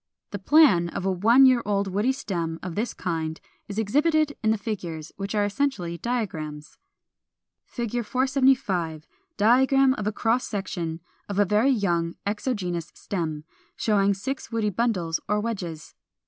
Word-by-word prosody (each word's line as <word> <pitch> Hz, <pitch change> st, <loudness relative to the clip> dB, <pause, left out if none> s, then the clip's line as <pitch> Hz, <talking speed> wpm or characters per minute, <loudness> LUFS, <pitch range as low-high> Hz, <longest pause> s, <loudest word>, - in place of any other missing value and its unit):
The 205 Hz, -, -4 dB
plan 195 Hz, -, +5 dB
of 185 Hz, -, -5 dB
a 195 Hz, -, +2 dB
one 230 Hz, +9 st, +5 dB
year 255 Hz, -2 st, +5 dB
old 200 Hz, -1 st, 0 dB
woody 205 Hz, +7 st, +1 dB
stem 170 Hz, -11 st, -3 dB
of 180 Hz, -2 st, -4 dB
this 220 Hz, +7 st, -2 dB
kind 160 Hz, -2 st, -3 dB, 0.3 s
is 205 Hz, -, -7 dB
exhibited 295 Hz, +7 st, +2 dB
in 220 Hz, -, +1 dB
the 220 Hz, -, +2 dB
figures, 175 Hz, -7 st, -5 dB
which 200 Hz, +1 st, -4 dB
are 205 Hz, -1 st, +2 dB
essentially 200 Hz, -7 st, -2 dB
diagrams. 160 Hz, -11 st, -4 dB, 1.0 s
[Illustration: 235 Hz, -2 st, -1 dB
Fig. 235 Hz, -, -3 dB
475. 250 Hz, -, +1 dB, 0.3 s
Diagram 260 Hz, +5 st, +4 dB
of 210 Hz, -5 st, -4 dB
a -, -, +1 dB
cross 230 Hz, +4 st, 0 dB
section 175 Hz, -5 st, -4 dB, 0.3 s
of 200 Hz, -, -3 dB
a 205 Hz, -, +4 dB
very 210 Hz, +7 st, +3 dB
young 175 Hz, -9 st, 0 dB
exogenous 200 Hz, -6 st, -2 dB
stem, 160 Hz, -6 st, -4 dB, 0.3 s
showing 200 Hz, -2 st, +2 dB
six 260 Hz, +5 st, -5 dB
woody 220 Hz, -2 st, 0 dB
bundles 185 Hz, -7 st, 0 dB
or 210 Hz, 0 st, +2 dB
wedges. 185 Hz, -8 st, -5 dB
205 Hz, 150 wpm, -25 LUFS, 175-240 Hz, 1.0 s, plan